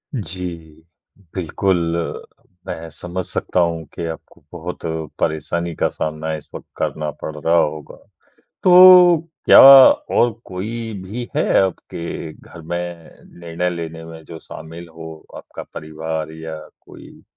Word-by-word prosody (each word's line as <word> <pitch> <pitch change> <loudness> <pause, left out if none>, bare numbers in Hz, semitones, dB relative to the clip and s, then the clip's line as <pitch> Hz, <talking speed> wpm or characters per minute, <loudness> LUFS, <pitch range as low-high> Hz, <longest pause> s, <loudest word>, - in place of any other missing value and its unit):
जी, 90 - -4 0.8
बिल्कुल, 95 +1 0 0.9
मैं 80 0 -6
समझ 90 +4 -6
सकता - - -2
हूँ 85 -1 0
कि 85 - -5
आपको 80 -2 -10
बहुत 90 +1 -7 0.4
परेशानी 80 +3 -2
का - - +1
सामना 80 +1 -4
इस 75 - -11
वक़्त - - -9
करना 75 -1 -2
पड़ 80 - -6
रहा 80 +3 +1
होगा। 75 -3 -1 0.7
तो 180 -1 +8 0.3
क्या - - +9
और 135 -3 +7
कोई 110 +5 -5
भी 120 +6 -6
है - - +2 0.2
आपके 85 -3 -4
घर 85 - -14
में 85 +2 -3 0.6
निर्णय 85 +1 -2
लेने 80 -1 -6
में 80 0 -11
जो 80 0 -10
शामिल 85 +2 -10
हो 80 0 -8 0.2
आपका - - -10
परिवार 80 0 -5
या 80 0 -7 0.2
कोई - - -15
85 Hz, 130 wpm, -19 LUFS, 80-95 Hz, 0.9 s, क्या